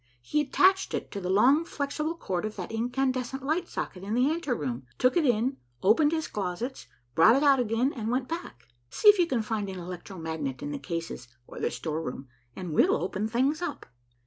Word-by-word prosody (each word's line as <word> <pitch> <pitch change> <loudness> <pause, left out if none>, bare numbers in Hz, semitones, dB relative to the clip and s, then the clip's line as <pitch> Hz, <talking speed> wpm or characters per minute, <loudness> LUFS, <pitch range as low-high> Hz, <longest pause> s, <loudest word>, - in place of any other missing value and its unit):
He 300 - +1
attached 375 +7 +3
it - - -5
to 200 - -5
the 180 - -3
long 255 - +5
flexible 305 +1 -3
cord 185 - -3
of 215 0 -4
that - - -6
incandescent 255 +3 -1
light 335 +5 0
socket 180 - -5
in 205 +3 -2
the 255 +4 +3
anteroom, 150 - -2
took 255 - +3
it 330 -5 +3
in, 245 +3 +1 0.3
opened 290 +10 +5
his 320 -1 -1
closets, 205 +6 -4 0.3
brought 215 - +6
it 275 - +2
out 280 -2 +5
again, 240 +3 +1
and 225 -3 -4
went 250 +1 0
back. 320 - -7 0.2
See 420 - +5
if 415 -2 +7
you 350 - +4
can 245 -8 0
find 210 -2 -2
an 190 - -6
electro 180 +2 -8
magnet 160 -5 -4
in 145 - -3
the 145 - -4
cases 165 -4 -5 0.2
or - - -10
the - - 0
storeroom, 150 -5 -4 0.3
and 180 -4 -5
we'll - - +4
open 190 +4 -2
things 265 +8 +1
up." 350 - -4
230 Hz, 200 wpm, -28 LUFS, 180-280 Hz, 0.3 s, if